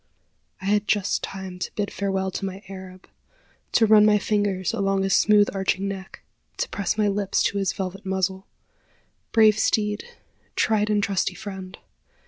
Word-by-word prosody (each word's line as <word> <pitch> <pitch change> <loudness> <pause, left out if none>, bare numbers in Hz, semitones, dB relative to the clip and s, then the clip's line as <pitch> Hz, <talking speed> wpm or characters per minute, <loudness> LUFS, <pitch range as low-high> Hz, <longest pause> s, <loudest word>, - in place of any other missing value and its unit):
I - - -7
had 205 +1 +1
just 200 -2 +1
time 190 -2 -6
to - - -4
bid 205 -1 -2
farewell 190 -1 -1
to - - -5
my 195 +1 -5
Arab 185 -1 -10 0.7
to 225 - +5
run 215 -1 +7
my 210 0 +5
fingers 205 -2 0
along 195 -3 +1
his 195 -1 +1
smooth 210 -1 +5
arching 195 0 0
neck 190 -1 -7 0.3
to - - -1
press 200 +1 -2
my 210 -1 +2
lips 200 -1 0
to 200 - 0
his 195 -1 +1
velvet 195 +1 -5
muzzle. 190 0 -2 0.8
Brave 215 -2 +5
steed! 210 -1 +1 0.5
tried 215 -1 +2
and 205 -1 +2
trusty 195 -3 0
friend! 190 -3 -8
195 Hz, 160 wpm, -24 LUFS, 190-210 Hz, 0.8 s, run